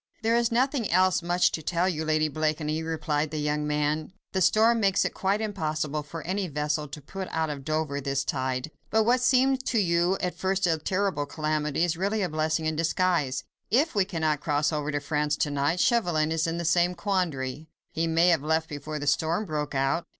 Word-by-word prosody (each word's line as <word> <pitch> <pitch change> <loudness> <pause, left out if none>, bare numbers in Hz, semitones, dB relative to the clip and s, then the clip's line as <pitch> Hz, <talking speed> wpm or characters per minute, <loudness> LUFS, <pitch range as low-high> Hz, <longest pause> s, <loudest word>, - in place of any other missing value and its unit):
"There 225 +1 +3
is 235 -1 +2
nothing 255 -1 +1
else 185 +1 +3
much 175 +1 +2
to 160 - -3
tell 170 +3 0
you, 160 -4 -1
Lady 155 0 +2
Blakeney," 155 +1 -1
replied 155 -2 -1
the 155 - -5
young 150 0 -1
man. 150 +2 -1 0.2
"The 190 - -1
storm 225 +4 +4
makes 195 -2 +2
it - - -2
quite 195 +3 0
impossible 155 -7 -2
for 155 +2 -8
any 190 +2 -2
vessel 150 0 -2
to 145 +2 -9
put 190 +5 -6
out 160 -1 -1
of 140 -2 -6
Dover 155 -1 -2
this 140 0 -1
tide. 130 +2 -2 0.2
But, 220 +1 +3
what 245 +3 +3
seemed 260 +1 +3
to 235 - +1
you 175 -1 +2
at 180 -1 -2
first 190 0 0
a 165 -2 +1
terrible 185 -4 -1
calamity 155 0 -1
is 170 -2 0
really 200 +3 0
a 180 - -1
blessing 155 +1 -1
in 155 0 0
disguise. 165 -5 0 0.3
If 285 +9 +2
we 200 -3 +3
cannot 160 -5 -1
cross 150 +1 0
over 150 0 -2
to 145 - -1
France 150 0 0
to 145 - 0
night, 145 +5 0
Chauvelin 175 -10 +2
is 160 0 0
in 165 +1 -2
the 170 - -3
same 175 +2 +2
quandary." 160 -7 -2 0.2
"He 165 +1 -1
may 165 +2 +4
have 165 -5 +3
left 160 +2 0
before 150 +1 -5
the 145 - -4
storm 165 +7 +1
broke 150 -4 -3
out." 135 +5 0
160 Hz, 210 wpm, -27 LUFS, 150-185 Hz, 0.3 s, storm